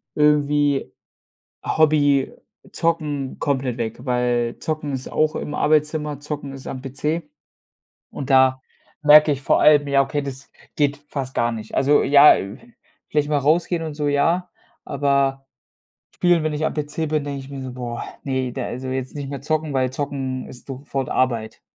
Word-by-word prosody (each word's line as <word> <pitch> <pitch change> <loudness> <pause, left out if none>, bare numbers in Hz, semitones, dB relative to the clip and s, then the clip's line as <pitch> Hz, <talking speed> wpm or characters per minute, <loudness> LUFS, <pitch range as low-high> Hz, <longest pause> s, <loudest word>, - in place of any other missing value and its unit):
irgendwie 145 -1 +2 0.7
Hobby 145 -3 +3 0.4
Zocken 150 -5 -2
komplett 130 -4 -1
weg, 115 +1 -5
weil 120 -2 0
Zocken 155 -3 -3
ist 130 0 -5
auch 155 0 +1
im 150 - -4
Arbeitszimmer, 150 -1 +1
Zocken 145 -2 -6
ist 135 -1 -10
am 130 -1 -5
PC 150 +5 -3 0.9
und 140 -1 -7
da 130 0 +5 0.4
merke 150 0 +7
ich 140 - -4
vor - - +2
allem, 145 -1 +5
ja, 140 0 +4
okay, 145 +2 -2
das 140 0 -8 0.3
geht 145 -1 +1
fast 135 -2 -5
gar 120 0 +1
nicht. 110 -1 -7
Also 145 +2 +4
ja, 145 +1 +7
äh, 100 +1 -5 0.5
vielleicht 150 -1 0
mal 150 -1 +2
rausgehen 165 +4 +1
und 155 -2 -5
so, 150 -1 -2
ja, 170 +5 +1 0.3
aber 135 -1 0 0.7
spielen, 175 -2 +3
wenn 155 - 0
ich 150 +1 -2
am - - -3
PC 150 +1 -3
bin, 155 -1 0
denke 140 -1 -4
ich 135 - -11
mir 135 -1 -6
so: 130 -1 -6
„Boah, 120 -2 -5 0.2
ne, 130 -2 -2
de 130 - -4
also 130 +2 -5
jetzt 130 0 -4
nicht 140 -2 -5
mehr 140 0 -5
zocken, 155 0 -1
weil 130 -1 +1
zocken 135 -2 -3
ist 125 - -12
sofort 135 0 -4
Arbeit.“ 115 -4 -1
140 Hz, 170 wpm, -22 LUFS, 130-150 Hz, 0.9 s, merke